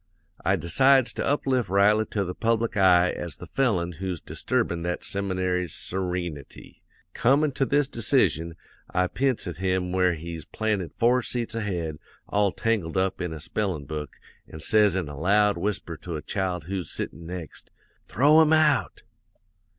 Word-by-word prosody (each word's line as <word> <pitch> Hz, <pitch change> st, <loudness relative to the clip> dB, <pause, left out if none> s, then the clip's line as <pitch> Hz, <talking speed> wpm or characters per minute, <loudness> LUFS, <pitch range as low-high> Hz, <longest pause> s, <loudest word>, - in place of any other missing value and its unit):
I 95 Hz, -, +3 dB
decides 130 Hz, -, +3 dB
to -, -, -3 dB
uplift 130 Hz, -6 st, 0 dB
Riley 105 Hz, +3 st, +3 dB
to 100 Hz, -, -1 dB
the 90 Hz, -, -4 dB
public 115 Hz, +2 st, 0 dB
eye 90 Hz, -2 st, +5 dB
as 85 Hz, -4 st, -5 dB
the -, -, -10 dB
felon 100 Hz, -11 st, 0 dB
who's 95 Hz, -3 st, -3 dB
disturbin' 85 Hz, +3 st, -2 dB
that 85 Hz, +1 st, -3 dB
seminary's 95 Hz, -3 st, -1 dB
sereenity. 90 Hz, -5 st, -5 dB, 0.3 s
Comin' 140 Hz, +4 st, +3 dB
to 135 Hz, 0 st, -1 dB
this 145 Hz, -1 st, +2 dB
decision, 95 Hz, -, +1 dB, 0.3 s
I 90 Hz, 0 st, +1 dB
p'ints 130 Hz, +5 st, -1 dB
at 90 Hz, -4 st, -5 dB
him 95 Hz, -1 st, -1 dB
where 90 Hz, -1 st, +2 dB
he's 85 Hz, 0 st, -6 dB
planted 100 Hz, +1 st, -2 dB
four 125 Hz, +2 st, +3 dB
seats 120 Hz, -1 st, -3 dB
ahead, 90 Hz, -9 st, -3 dB, 0.3 s
all 100 Hz, -1 st, +2 dB
tangled 100 Hz, -7 st, -1 dB
up 95 Hz, 0 st, 0 dB
in 90 Hz, -2 st, -3 dB
a 80 Hz, -, -6 dB
spellin' 85 Hz, -2 st, -3 dB
book, 75 Hz, +1 st, -6 dB, 0.4 s
an' 80 Hz, -, -8 dB
says 105 Hz, +4 st, +3 dB
in 95 Hz, -4 st, -1 dB
a 75 Hz, -, -7 dB
loud 100 Hz, +6 st, +3 dB
whisper 85 Hz, -2 st, -2 dB
to 85 Hz, +2 st, -6 dB
a 75 Hz, -, -5 dB
child 90 Hz, -4 st, -2 dB
who's 90 Hz, -1 st, -4 dB
sittin' 80 Hz, +2 st, -5 dB
next: 90 Hz, -3 st, -8 dB, 0.4 s
"'"Throw 150 Hz, -, +5 dB
him 160 Hz, 0 st, +4 dB
out!" 150 Hz, -, +2 dB
95 Hz, 160 wpm, -25 LUFS, 85-115 Hz, 0.4 s, eye